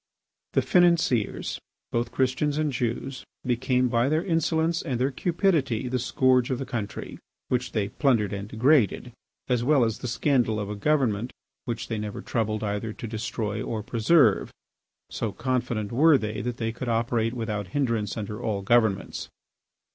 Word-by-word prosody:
The -, -, +3 dB
financiers, 170 Hz, -, +2 dB, 0.3 s
both 120 Hz, 0 st, -1 dB
Christians 135 Hz, +3 st, 0 dB
and 155 Hz, -1 st, +1 dB
Jews, 125 Hz, +1 st, -3 dB, 0.2 s
became 125 Hz, +1 st, +1 dB
by 120 Hz, +2 st, +2 dB
their 155 Hz, +3 st, +1 dB
insolence 165 Hz, -1 st, +1 dB
and 130 Hz, -7 st, -3 dB
their 130 Hz, +3 st, +1 dB
cupidity 155 Hz, -, +1 dB
the 125 Hz, +1 st, -1 dB
scourge 130 Hz, 0 st, +2 dB
of 130 Hz, -, 0 dB
the 135 Hz, -, -4 dB
country, 110 Hz, -5 st, -5 dB, 0.3 s
which 125 Hz, -1 st, -1 dB
they 105 Hz, -3 st, 0 dB
plundered 115 Hz, -8 st, +1 dB
and 100 Hz, 0 st, -4 dB
degraded, 120 Hz, -, +2 dB, 0.4 s
as 125 Hz, -2 st, +1 dB
well 135 Hz, -2 st, +4 dB
as 110 Hz, -1 st, -2 dB
the 125 Hz, -, -4 dB
scandal 120 Hz, -3 st, +1 dB
of 105 Hz, 0 st, -4 dB
a -, -, -4 dB
government 120 Hz, -2 st, +1 dB, 0.3 s
which 120 Hz, -1 st, -4 dB
they 110 Hz, -2 st, -3 dB
never 105 Hz, -1 st, -5 dB
troubled 110 Hz, -2 st, -1 dB
either 105 Hz, +1 st, -2 dB
to -, -, -8 dB
destroy 110 Hz, -1 st, -3 dB
or 110 Hz, -1 st, -3 dB
preserve, 120 Hz, +9 st, +3 dB, 0.6 s
so 110 Hz, -3 st, -2 dB
confident 120 Hz, -4 st, -2 dB
were 150 Hz, +5 st, +5 dB
they 105 Hz, -3 st, -3 dB
that 120 Hz, -1 st, -3 dB
they 115 Hz, -1 st, -1 dB
could 120 Hz, +2 st, -5 dB
operate 115 Hz, 0 st, 0 dB
without 105 Hz, -4 st, -3 dB
hindrance 115 Hz, -3 st, -1 dB
under 105 Hz, +1 st, -5 dB
all 105 Hz, -4 st, -2 dB
governments. 110 Hz, -2 st, +1 dB
120 Hz, 160 wpm, -26 LUFS, 110-135 Hz, 0.6 s, were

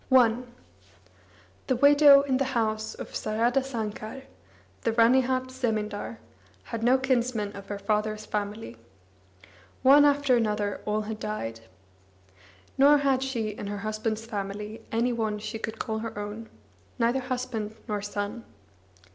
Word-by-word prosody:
I 240 Hz, -4 st, +6 dB, 1.3 s
The 260 Hz, -, +2 dB
widow 285 Hz, +1 st, +7 dB
in 265 Hz, -2 st, +1 dB
the 275 Hz, -, +1 dB
house 220 Hz, -1 st, -1 dB
of -, -, -9 dB
Saradasankar, 230 Hz, +1 st, -2 dB, 0.6 s
the 230 Hz, -, 0 dB
Ranihat 255 Hz, +2 st, +3 dB
zemindar, 220 Hz, -4 st, -2 dB, 0.5 s
had 230 Hz, -2 st, -5 dB
no 245 Hz, +3 st, +4 dB
kinsmen 245 Hz, -5 st, 0 dB
of 200 Hz, 0 st, -9 dB
her 205 Hz, -, -4 dB
father's 215 Hz, +1 st, -1 dB
family. 205 Hz, -, -4 dB, 1.1 s
One 280 Hz, +2 st, +8 dB
after 285 Hz, -2 st, +4 dB
another 210 Hz, -3 st, 0 dB
all 210 Hz, +1 st, +1 dB
had 215 Hz, 0 st, -5 dB
died. 115 Hz, -, -4 dB, 1.2 s
Nor 285 Hz, +2 st, +7 dB
had 275 Hz, -2 st, +2 dB
she 245 Hz, -5 st, -2 dB
in 205 Hz, -1 st, -6 dB
her 205 Hz, 0 st, -4 dB
husband's 215 Hz, +1 st, -2 dB
family 210 Hz, 0 st, -5 dB
any 235 Hz, +2 st, +1 dB
one 220 Hz, -2 st, -1 dB
she 215 Hz, +1 st, -6 dB
could 220 Hz, 0 st, -5 dB
call 220 Hz, -2 st, -3 dB
her 225 Hz, -1 st, -6 dB
own, 210 Hz, +2 st, -6 dB, 0.5 s
neither 235 Hz, +3 st, +2 dB
husband 250 Hz, -4 st, -4 dB
nor 210 Hz, -2 st, -2 dB
son. 205 Hz, +3 st, -4 dB
225 Hz, 130 wpm, -27 LUFS, 210-255 Hz, 1.3 s, One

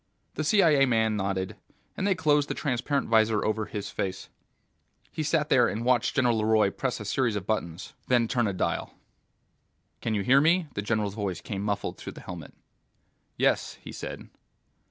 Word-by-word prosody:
The 155 Hz, -, -3 dB
CIA 155 Hz, -6 st, +4 dB
man 110 Hz, -3 st, +2 dB
nodded, 95 Hz, -2 st, -2 dB, 0.4 s
and 195 Hz, -, -1 dB
they 195 Hz, -, +3 dB
closed 150 Hz, -3 st, +2 dB
the -, -, -2 dB
transparent 140 Hz, +1 st, -1 dB
visor 110 Hz, -1 st, +3 dB
over 110 Hz, 0 st, -1 dB
his 105 Hz, -2 st, -5 dB
face. 95 Hz, -1 st, -4 dB, 0.8 s
He -, -, -4 dB
sat 150 Hz, 0 st, +1 dB
there 125 Hz, -2 st, +5 dB
and 115 Hz, +3 st, -3 dB
watched 125 Hz, -2 st, +2 dB
General 120 Hz, -5 st, +2 dB
LeRoy 110 Hz, -2 st, +3 dB
press 130 Hz, -3 st, -2 dB
a 105 Hz, -, -7 dB
series 120 Hz, +1 st, 0 dB
of 100 Hz, -2 st, -3 dB
buttons, 95 Hz, -3 st, -3 dB
then 120 Hz, -2 st, +3 dB
turn 120 Hz, -2 st, +1 dB
a 100 Hz, -, -1 dB
dial. 90 Hz, -, -2 dB, 1.1 s
"Can 110 Hz, -, -1 dB
you 100 Hz, -, 0 dB
hear 135 Hz, +6 st, +5 dB
me?" 170 Hz, +3 st, +3 dB
The 100 Hz, -, -2 dB
general's 105 Hz, -1 st, -1 dB
voice 100 Hz, -5 st, -3 dB
came 100 Hz, -2 st, -5 dB
muffled 100 Hz, -1 st, -2 dB
through -, -, -7 dB
the -, -, -11 dB
helmet. 85 Hz, -4 st, -9 dB, 0.8 s
"Yes," -, -, +1 dB
he -, -, -10 dB
said. -, -, -7 dB
110 Hz, 175 wpm, -27 LUFS, 105-135 Hz, 1.1 s, there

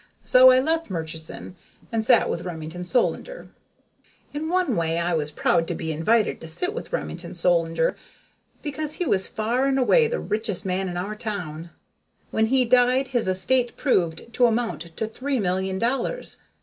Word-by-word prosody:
So 255 Hz, +1 st, +7 dB
I 255 Hz, 0 st, +6 dB
left 320 Hz, +2 st, 0 dB
Murchison 160 Hz, 0 st, -6 dB, 0.4 s
and 225 Hz, -1 st, 0 dB
sat -, -, +4 dB
with 170 Hz, -, -2 dB
Remington 170 Hz, 0 st, -6 dB
Solander. 265 Hz, -, -1 dB, 0.8 s
In 305 Hz, +2 st, -3 dB
one 360 Hz, -8 st, +1 dB
way 165 Hz, -1 st, 0 dB
I 170 Hz, +1 st, 0 dB
was 155 Hz, -2 st, 0 dB
proud 165 Hz, +2 st, +1 dB
to -, -, -2 dB
be 160 Hz, -, -3 dB
invited 210 Hz, +8 st, +1 dB
to 160 Hz, -, -7 dB
sit 360 Hz, -, -1 dB
with -, -, -7 dB
Remington -, -, -5 dB
Solander, 165 Hz, -1 st, +1 dB, 0.7 s
because 300 Hz, 0 st, -2 dB
he 355 Hz, -, -2 dB
was 190 Hz, -, +2 dB
far 240 Hz, +5 st, 0 dB
and 270 Hz, -1 st, +1 dB
away 460 Hz, -, +4 dB
the 485 Hz, +1 st, -2 dB
richest 210 Hz, -3 st, -2 dB
man 190 Hz, 0 st, -1 dB
in 175 Hz, -, -5 dB
our 200 Hz, +4 st, -3 dB
town. 175 Hz, -7 st, -5 dB, 0.6 s
When 220 Hz, 0 st, +2 dB
he 255 Hz, +1 st, +3 dB
died, 250 Hz, +2 st, +3 dB
his 240 Hz, -6 st, 0 dB
estate 240 Hz, +7 st, +1 dB
proved 185 Hz, -, 0 dB
to 245 Hz, +1 st, +4 dB
amount 230 Hz, -5 st, -1 dB, 0.2 s
to 220 Hz, -, -1 dB
three 260 Hz, +4 st, -2 dB
million 190 Hz, 0 st, -1 dB
dollars. 260 Hz, -, -2 dB
220 Hz, 170 wpm, -24 LUFS, 175-260 Hz, 0.8 s, So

